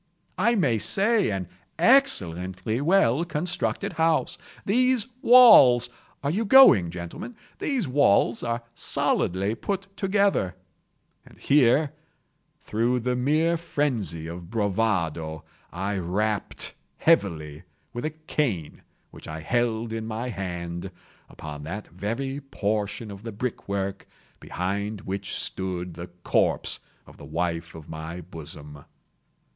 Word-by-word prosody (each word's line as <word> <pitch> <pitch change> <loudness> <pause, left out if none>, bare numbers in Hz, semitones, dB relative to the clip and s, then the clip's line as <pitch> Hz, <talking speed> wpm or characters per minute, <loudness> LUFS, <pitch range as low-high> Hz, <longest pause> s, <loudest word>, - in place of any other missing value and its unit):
—"I 235 +2 +3
may 130 - +2
say 205 - +2
an 95 -3 -3 0.3
excellently 110 - +2
well 165 -4 +3
constructed 175 +2 -2
house. 160 -1 +1 0.3
These 250 +2 +3 0.2
walls—are 140 - +6
you 205 +7 0
going, 215 - +7
gentlemen?—these 205 - -5
walls 125 -4 +3
are 120 0 -2
solidly 95 -3 0
put 195 - -4
together;" 195 - +1 0.7
and - - -18
here, 140 +1 +3 0.7
through 120 +3 0
the 125 +1 -1
mere 155 +7 +2
phrenzy 130 - -2
of 85 +1 -8
bravado, 95 -8 -1 0.3
I 95 +2 -2
rapped 100 +4 -2 0.2
heavily, 80 - +1 0.3
with 120 - -5
a 155 - 0
cane 150 - -3 0.3
which - - -12
I 80 0 -6
held 115 +3 -1
in 110 -1 -4
my 115 +3 -4
hand, 85 -3 -5 0.4
upon 75 -1 -8
that 100 +6 -6
very 115 - -4
portion 105 -4 -3
of 100 -1 -10
the 115 +1 -6
brick 110 0 -5
work 100 -1 -3 0.3
behind 100 +3 -3
which 95 +1 -4
stood 90 -2 -3
the 85 +2 -8 0.2
corpse - - +1 0.3
of - - -16
the - - -11
wife 85 +2 -3
of 80 -2 -11
my 80 +2 -7
bosom. 75 -3 -10
110 Hz, 115 wpm, -25 LUFS, -, 0.7 s, going